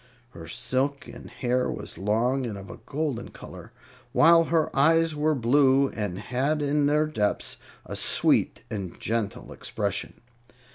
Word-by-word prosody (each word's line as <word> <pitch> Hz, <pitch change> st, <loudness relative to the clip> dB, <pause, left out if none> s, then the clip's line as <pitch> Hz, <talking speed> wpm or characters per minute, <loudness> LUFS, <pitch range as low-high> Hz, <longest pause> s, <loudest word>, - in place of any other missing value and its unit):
Her 80 Hz, -8 st, -10 dB
silken 130 Hz, -, -2 dB
hair 125 Hz, -1 st, -1 dB
was -, -, -6 dB
long 120 Hz, +6 st, +1 dB
and 105 Hz, -3 st, -5 dB
of 95 Hz, -2 st, -9 dB
a -, -, -10 dB
golden 140 Hz, -5 st, -3 dB
color, -, -, -11 dB, 0.4 s
while 165 Hz, +1 st, +6 dB
her 165 Hz, -1 st, 0 dB
eyes 165 Hz, +3 st, +4 dB
were 155 Hz, +1 st, +1 dB
blue, 135 Hz, +2 st, +4 dB
and 105 Hz, -4 st, -4 dB
had 135 Hz, +8 st, -1 dB
in 145 Hz, 0 st, +2 dB
their 150 Hz, +1 st, +3 dB
depths 105 Hz, -10 st, -1 dB, 0.3 s
a -, -, -6 dB
sweet -, -, +1 dB
and 95 Hz, -4 st, -5 dB
gentle 110 Hz, -3 st, -3 dB
expression. -, -, -3 dB
130 Hz, 140 wpm, -26 LUFS, 110-150 Hz, 0.4 s, while